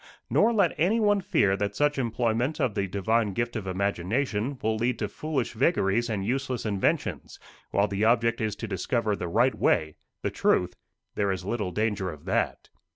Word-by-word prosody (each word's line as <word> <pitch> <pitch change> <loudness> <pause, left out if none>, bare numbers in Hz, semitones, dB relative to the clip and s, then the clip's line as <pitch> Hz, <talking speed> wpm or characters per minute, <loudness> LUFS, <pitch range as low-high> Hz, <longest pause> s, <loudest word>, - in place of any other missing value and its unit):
Nor 225 - +4
let 200 -7 +3
anyone 205 +3 +3
fear 160 - +2
that 100 0 -2
such 145 -1 +1
employment 120 +3 0
of 120 - +1
the 100 -1 -1
divine 105 +2 0
gift 120 +3 -2
of 105 -4 -4
imagination 105 +7 -1
will 110 0 +1
lead 120 +2 0
to 105 - -2
foolish 135 +3 -3
vagaries 120 - +1
and 100 -3 -2
useless 130 +1 -2
inventions; 100 -3 -1 0.3
while 100 +1 +2
the 100 +1 -2
object 115 0 +3
is 110 -2 -1
to 115 - -6
discover 105 +3 -1
the 90 - -4
right 120 +9 +3
way 80 -1 +1 0.3
the - - -1
truth 90 0 +1 0.4
there 100 -1 0
is 95 -1 -4
little 105 -2 -2
danger 100 0 -1
of 75 -4 -10
that. - - -1
110 Hz, 175 wpm, -27 LUFS, 100-125 Hz, 0.4 s, Nor